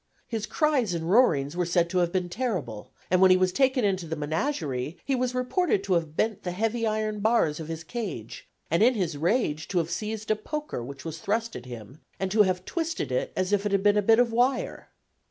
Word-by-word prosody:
His 220 Hz, -2 st, -3 dB
cries 270 Hz, -, +1 dB
and 165 Hz, +1 st, -2 dB
roarings 160 Hz, -, +3 dB
were 180 Hz, -, +1 dB
said 175 Hz, -1 st, +2 dB
to 185 Hz, -, +2 dB
have 175 Hz, -1 st, +1 dB
been 180 Hz, -1 st, -1 dB
terrible, 175 Hz, -, -4 dB, 0.2 s
and 185 Hz, 0 st, +4 dB
when 190 Hz, -, +7 dB
he 185 Hz, -, +6 dB
was 185 Hz, 0 st, +2 dB
taken 260 Hz, +2 st, +2 dB
into 190 Hz, -4 st, 0 dB
the 160 Hz, -, -3 dB
menagerie, 155 Hz, -, -2 dB
he 275 Hz, -, 0 dB
was 250 Hz, -1 st, 0 dB
reported 255 Hz, -, +1 dB
to 195 Hz, -2 st, 0 dB
have 160 Hz, -3 st, -1 dB
bent 220 Hz, -2 st, 0 dB
the 180 Hz, -, -4 dB
heavy 225 Hz, +4 st, 0 dB
iron 215 Hz, 0 st, -1 dB
bars 205 Hz, -8 st, +2 dB
of 160 Hz, -, -6 dB
his 165 Hz, 0 st, -5 dB
cage, 170 Hz, -, -6 dB, 0.2 s
and 170 Hz, -, +2 dB
in 245 Hz, +3 st, +5 dB
his 175 Hz, -7 st, -1 dB
rage 160 Hz, -, 0 dB
to 185 Hz, -, -2 dB
have 170 Hz, -1 st, 0 dB
seized 215 Hz, +4 st, -3 dB
a -, -, +4 dB
poker 295 Hz, -, -5 dB
which 135 Hz, +4 st, -9 dB
was 165 Hz, 0 st, -5 dB
thrust 225 Hz, +5 st, -1 dB
at 125 Hz, -, -8 dB
him, 120 Hz, +4 st, -10 dB, 0.2 s
and 190 Hz, -1 st, -2 dB
to 215 Hz, +1 st, +5 dB
have 185 Hz, -2 st, +1 dB
twisted 330 Hz, -, -3 dB
it 125 Hz, -, -1 dB
as 185 Hz, +2 st, 0 dB
if 200 Hz, -1 st, +2 dB
it 205 Hz, -, -1 dB
had 200 Hz, -1 st, +1 dB
been 205 Hz, 0 st, +5 dB
a 210 Hz, -, +3 dB
bit 225 Hz, +2 st, +5 dB
of 245 Hz, -1 st, +3 dB
wire. 250 Hz, +2 st, 0 dB
190 Hz, 230 wpm, -27 LUFS, 165-230 Hz, 0.2 s, when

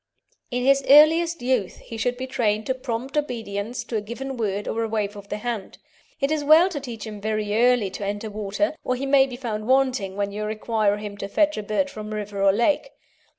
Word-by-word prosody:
In 245 Hz, -1 st, -2 dB
his 275 Hz, +1 st, +4 dB
earliest 325 Hz, +2 st, +6 dB
youth 245 Hz, -7 st, 0 dB
he 230 Hz, -, -10 dB
should 245 Hz, +2 st, -1 dB
be 260 Hz, -, -4 dB
trained 220 Hz, -4 st, 0 dB
to 260 Hz, -, 0 dB
prompt 255 Hz, +1 st, -5 dB
obedience 235 Hz, -5 st, -3 dB
to 235 Hz, -1 st, -3 dB
a -, -, -1 dB
given 260 Hz, +5 st, -6 dB
word 205 Hz, -3 st, -2 dB
or 225 Hz, -, -1 dB
a -, -, -1 dB
wave 210 Hz, -2 st, -2 dB
of 200 Hz, -1 st, -11 dB
the 210 Hz, -, -3 dB
hand. 220 Hz, -3 st, -5 dB, 0.4 s
It 275 Hz, +1 st, 0 dB
is 310 Hz, -1 st, 0 dB
well 315 Hz, +5 st, +6 dB
to 320 Hz, -6 st, -4 dB
teach 240 Hz, -6 st, -7 dB
him 210 Hz, -2 st, -8 dB
very 215 Hz, -1 st, -1 dB
early 240 Hz, -4 st, +3 dB
to 205 Hz, -, -6 dB
enter 205 Hz, +2 st, -4 dB
water, 210 Hz, +9 st, -1 dB
or 255 Hz, -, 0 dB
he 265 Hz, +2 st, -3 dB
may 270 Hz, -1 st, +5 dB
be 255 Hz, -, -7 dB
found 220 Hz, -4 st, -4 dB
wanting 255 Hz, -7 st, +2 dB
when 200 Hz, 0 st, -1 dB
you 210 Hz, +1 st, -4 dB
require 215 Hz, -1 st, 0 dB
him 210 Hz, -1 st, -7 dB
to 200 Hz, -, -5 dB
fetch 305 Hz, +8 st, +2 dB
a -, -, -3 dB
bird 215 Hz, +7 st, 0 dB
from 215 Hz, 0 st, -7 dB
river 205 Hz, -1 st, -4 dB
or 195 Hz, 0 st, +6 dB
lake. 240 Hz, -, +1 dB
230 Hz, 225 wpm, -24 LUFS, 210-265 Hz, 0.4 s, earliest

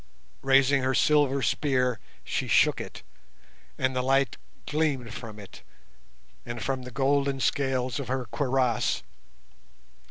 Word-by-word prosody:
Raising 135 Hz, 0 st, +4 dB
her 130 Hz, 0 st, 0 dB
silver 140 Hz, -2 st, +3 dB
spear, 125 Hz, 0 st, +1 dB, 0.2 s
she -, -, -2 dB
shook -, -, +3 dB
it, -, -, -9 dB, 0.7 s
and 130 Hz, 0 st, 0 dB
the 125 Hz, -, +1 dB
light 135 Hz, +1 st, +2 dB, 0.3 s
gleamed 140 Hz, -7 st, -1 dB
from 115 Hz, -4 st, -8 dB
it 100 Hz, -2 st, -12 dB, 0.8 s
and 120 Hz, 0 st, -6 dB
from 135 Hz, -1 st, -2 dB
the 125 Hz, -, -8 dB
golden 140 Hz, +1 st, +1 dB
scales 130 Hz, 0 st, 0 dB
of 140 Hz, -, -5 dB
her 130 Hz, 0 st, -2 dB
cuirass. 125 Hz, -1 st, 0 dB
130 Hz, 125 wpm, -27 LUFS, 125-140 Hz, 0.8 s, Raising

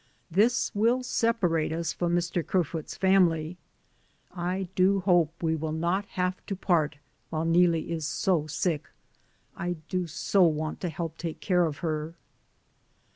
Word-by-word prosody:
This 220 Hz, +8 st, +2 dB
will 235 Hz, +5 st, +2 dB
separate 185 Hz, -11 st, +1 dB
us 165 Hz, +1 st, -2 dB
from 175 Hz, -1 st, 0 dB
Mr. 175 Hz, 0 st, 0 dB
Ker 185 Hz, +1 st, +1 dB
foot's 160 Hz, 0 st, -6 dB
family; 180 Hz, -3 st, +2 dB, 0.7 s
I 180 Hz, +1 st, -2 dB
do 190 Hz, +1 st, +3 dB
hope 175 Hz, -4 st, +3 dB
we 160 Hz, -1 st, +2 dB
will 160 Hz, 0 st, -3 dB
not 170 Hz, +5 st, 0 dB
have 180 Hz, 0 st, -1 dB
to 195 Hz, -, -2 dB
part 165 Hz, -6 st, +1 dB, 0.3 s
while 160 Hz, 0 st, -2 dB
Neelie 170 Hz, -1 st, +3 dB
is 160 Hz, -3 st, -2 dB
so 165 Hz, -3 st, +1 dB
sick. 160 Hz, 0 st, -1 dB, 0.7 s
I 175 Hz, +1 st, -2 dB, 0.2 s
do 185 Hz, -2 st, -1 dB
so 185 Hz, +4 st, +1 dB
want 155 Hz, -2 st, +2 dB
to 180 Hz, -, -1 dB
help 165 Hz, +1 st, -5 dB
take 165 Hz, -2 st, -4 dB
care 180 Hz, -3 st, +2 dB
of 145 Hz, -2 st, -5 dB
her. 155 Hz, +1 st, -2 dB
175 Hz, 150 wpm, -28 LUFS, 160-185 Hz, 0.7 s, do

